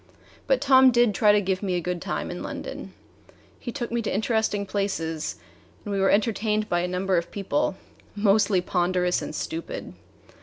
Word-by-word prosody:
But 265 Hz, -2 st, +2 dB
Tom 265 Hz, -2 st, +7 dB
did 240 Hz, -3 st, +3 dB
try 210 Hz, +1 st, +4 dB
to 205 Hz, -, +4 dB
give 190 Hz, -1 st, -1 dB
me 190 Hz, -3 st, -1 dB
a -, -, +1 dB
good 180 Hz, 0 st, -3 dB
time -, -, -3 dB
in -, -, -6 dB
London. -, -, -6 dB, 0.7 s
He 240 Hz, -, -5 dB
took 240 Hz, -3 st, -5 dB
me 235 Hz, 0 st, 0 dB
to 220 Hz, -, -3 dB
interesting 220 Hz, -1 st, 0 dB
places 165 Hz, -6 st, -2 dB, 0.5 s
and 205 Hz, -, -3 dB
we 195 Hz, -, 0 dB
were 195 Hz, -, +3 dB
entertained 215 Hz, 0 st, +1 dB
by 175 Hz, -, +1 dB
a 175 Hz, -, -1 dB
number 185 Hz, +1 st, 0 dB
of 170 Hz, -, -8 dB
people, 190 Hz, -3 st, -1 dB, 0.4 s
mostly 205 Hz, -2 st, +3 dB
ponderous 180 Hz, 0 st, 0 dB
and -, -, -6 dB
stupid. 165 Hz, +1 st, -5 dB
200 Hz, 180 wpm, -25 LUFS, 180-220 Hz, 0.7 s, Tom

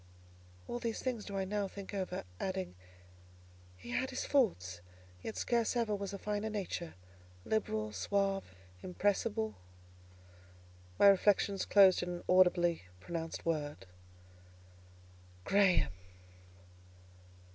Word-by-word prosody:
All 240 Hz, -, -3 dB
these 230 Hz, -2 st, -3 dB
things 245 Hz, -5 st, -3 dB
do 200 Hz, -1 st, -5 dB
I 190 Hz, -, 0 dB
now 205 Hz, +1 st, -1 dB
think 200 Hz, +1 st, -9 dB
over, 185 Hz, -2 st, -3 dB, 0.2 s
adding, 190 Hz, -, -3 dB, 1.0 s
"He 120 Hz, +6 st, -9 dB
had 260 Hz, -, 0 dB
his 260 Hz, -, -3 dB
faults, 90 Hz, -, +1 dB, 0.4 s
yet 220 Hz, -, -6 dB
scarce 235 Hz, -1 st, +1 dB
ever 230 Hz, -3 st, +1 dB
was 200 Hz, -1 st, -4 dB
a 200 Hz, -, -5 dB
finer 210 Hz, +2 st, -2 dB
nature; 190 Hz, -5 st, -4 dB, 0.5 s
liberal, 110 Hz, -, -1 dB
suave, 195 Hz, -, -1 dB, 0.3 s
impressible." 205 Hz, -, 0 dB, 1.4 s
My -, -, +5 dB
reflections 200 Hz, 0 st, +4 dB
closed 195 Hz, -3 st, +6 dB
in 180 Hz, -, -3 dB
an 175 Hz, 0 st, -5 dB
audibly 175 Hz, -, +4 dB
pronounced 165 Hz, -, -5 dB
word, 150 Hz, -, -2 dB, 1.6 s
"Graham!" 190 Hz, -, +4 dB
195 Hz, 110 wpm, -34 LUFS, 175-210 Hz, 1.6 s, closed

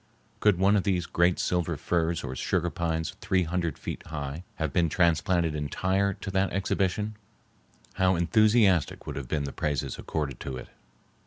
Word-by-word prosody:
Could 105 Hz, -4 st, +4 dB
one 95 Hz, +3 st, +4 dB
of 100 Hz, -, +3 dB
these 90 Hz, -3 st, 0 dB
great 85 Hz, +1 st, +2 dB
silver 85 Hz, -3 st, 0 dB
firs 85 Hz, +2 st, 0 dB
or 65 Hz, -2 st, -4 dB
sugar 85 Hz, +5 st, 0 dB
pines 80 Hz, -2 st, -2 dB
three 95 Hz, -1 st, +2 dB
hundred 85 Hz, -3 st, -2 dB
feet -, -, -5 dB
high 75 Hz, +1 st, -5 dB
have 80 Hz, -3 st, -2 dB
been 85 Hz, -2 st, +3 dB
transplanted 85 Hz, 0 st, +2 dB
entire 95 Hz, +7 st, 0 dB
to 95 Hz, -, -6 dB
that 95 Hz, 0 st, +1 dB
exhibition, 100 Hz, +2 st, 0 dB, 0.9 s
how 95 Hz, 0 st, +4 dB
enthusiastic 105 Hz, 0 st, +3 dB
would -, -, -5 dB
have 70 Hz, -3 st, -5 dB
been 75 Hz, +1 st, -1 dB
the 70 Hz, -, -4 dB
praises 75 Hz, -4 st, -2 dB
accorded 70 Hz, -5 st, -3 dB
to 65 Hz, -2 st, -5 dB
it! -, -, -9 dB
85 Hz, 165 wpm, -28 LUFS, 75-95 Hz, 0.9 s, Could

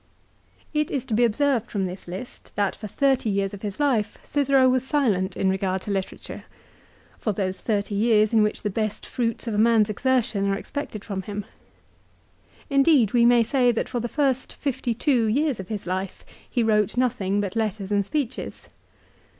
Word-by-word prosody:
It 300 Hz, -1 st, +1 dB
is 265 Hz, -3 st, -2 dB
to 240 Hz, -, -4 dB
be 235 Hz, +3 st, +3 dB
observed 240 Hz, 0 st, +1 dB
from 195 Hz, -3 st, -1 dB
this 185 Hz, 0 st, -7 dB
list 190 Hz, +8 st, -8 dB
that 200 Hz, -2 st, 0 dB
for 215 Hz, -, -7 dB
thirty 265 Hz, +1 st, +1 dB
years 200 Hz, 0 st, 0 dB
of 200 Hz, -, -8 dB
his 205 Hz, +1 st, -5 dB
life 235 Hz, -8 st, +1 dB
Cicero 275 Hz, -2 st, +3 dB
was 255 Hz, -1 st, +2 dB
silent 225 Hz, -10 st, 0 dB
in 195 Hz, -, +1 dB
regard 190 Hz, 0 st, 0 dB
to 205 Hz, -, -4 dB
literature, 195 Hz, -1 st, -4 dB, 0.7 s
for 215 Hz, -, -1 dB
those 190 Hz, -1 st, -2 dB
thirty 205 Hz, -2 st, -1 dB
years 215 Hz, +1 st, +3 dB
in 220 Hz, -, +5 dB
which 210 Hz, 0 st, 0 dB
the 210 Hz, -, -1 dB
best 215 Hz, +1 st, -2 dB
fruits 230 Hz, -2 st, -2 dB
of 230 Hz, -, -2 dB
a 205 Hz, -, 0 dB
man's 220 Hz, -1 st, +4 dB
exertion 230 Hz, -4 st, +1 dB
are 195 Hz, -, +1 dB
expected 225 Hz, -7 st, -6 dB
from 195 Hz, -3 st, -3 dB
him. 205 Hz, +1 st, -5 dB, 1.2 s
Indeed 275 Hz, -, +4 dB
we 235 Hz, -1 st, +5 dB
may 240 Hz, -1 st, +5 dB
say 245 Hz, +1 st, +3 dB
that 230 Hz, -, -2 dB
for 245 Hz, -, -2 dB
the 240 Hz, -, -2 dB
first 265 Hz, -1 st, 0 dB
fifty 250 Hz, -4 st, -2 dB
two 245 Hz, -2 st, +2 dB
years 275 Hz, +2 st, +1 dB
of 190 Hz, -, -6 dB
his 210 Hz, -1 st, -5 dB
life 185 Hz, +1 st, -4 dB, 0.2 s
he 240 Hz, -, +1 dB
wrote 210 Hz, 0 st, +2 dB
nothing 210 Hz, -6 st, +1 dB
but 200 Hz, 0 st, -2 dB
letters 210 Hz, -3 st, -2 dB
and 200 Hz, -1 st, +2 dB
speeches. 260 Hz, +3 st, -4 dB
220 Hz, 185 wpm, -24 LUFS, 200-255 Hz, 1.2 s, in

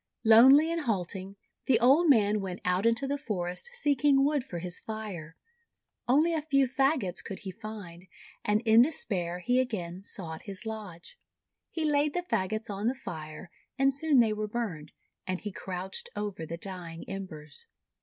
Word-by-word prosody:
Lonely 265 Hz, +8 st, +7 dB
and 335 Hz, 0 st, -1 dB
halting, 190 Hz, -, -3 dB, 0.3 s
the 245 Hz, -4 st, +4 dB
old 280 Hz, +8 st, +5 dB
man 210 Hz, -5 st, +4 dB
went 185 Hz, -2 st, -5 dB
out 180 Hz, +4 st, +2 dB
into 230 Hz, +4 st, +2 dB
the 285 Hz, +1 st, -2 dB
forest 180 Hz, -, -4 dB
seeking 285 Hz, -, +3 dB
wood 290 Hz, -2 st, +1 dB
for 175 Hz, -, -7 dB
his 175 Hz, +1 st, -5 dB
fire. 200 Hz, -8 st, -7 dB, 0.7 s
Only 305 Hz, +7 st, +4 dB
a 320 Hz, -, 0 dB
few 275 Hz, -3 st, +2 dB
fagots 265 Hz, -, 0 dB
could 195 Hz, -, -7 dB
he 195 Hz, -, -6 dB
find, 195 Hz, -4 st, -9 dB, 0.4 s
and 210 Hz, +1 st, +2 dB
in 225 Hz, 0 st, +6 dB
despair 180 Hz, -, -1 dB
he 245 Hz, +5 st, +2 dB
again 190 Hz, -8 st, -3 dB
sought 165 Hz, -5 st, -6 dB
his 200 Hz, +1 st, -7 dB
lodge. 215 Hz, -, -8 dB, 0.5 s
He 320 Hz, -2 st, -2 dB
laid 295 Hz, -1 st, +2 dB
the 355 Hz, -, 0 dB
fagots 220 Hz, -, -1 dB
on 205 Hz, +1 st, -3 dB
the 255 Hz, -, +1 dB
Fire, 160 Hz, -6 st, -8 dB, 0.3 s
and 270 Hz, 0 st, +3 dB
soon 285 Hz, -2 st, +4 dB
they 220 Hz, -2 st, +2 dB
were 215 Hz, 0 st, -3 dB
burned; 200 Hz, -10 st, -4 dB, 0.4 s
and 185 Hz, 0 st, -2 dB
he 210 Hz, -, -5 dB
crouched 185 Hz, 0 st, -5 dB
over 205 Hz, -6 st, -4 dB
the 170 Hz, -, -5 dB
dying 175 Hz, -3 st, -7 dB
embers. 160 Hz, -7 st, -7 dB
215 Hz, 165 wpm, -29 LUFS, 180-270 Hz, 0.7 s, Lonely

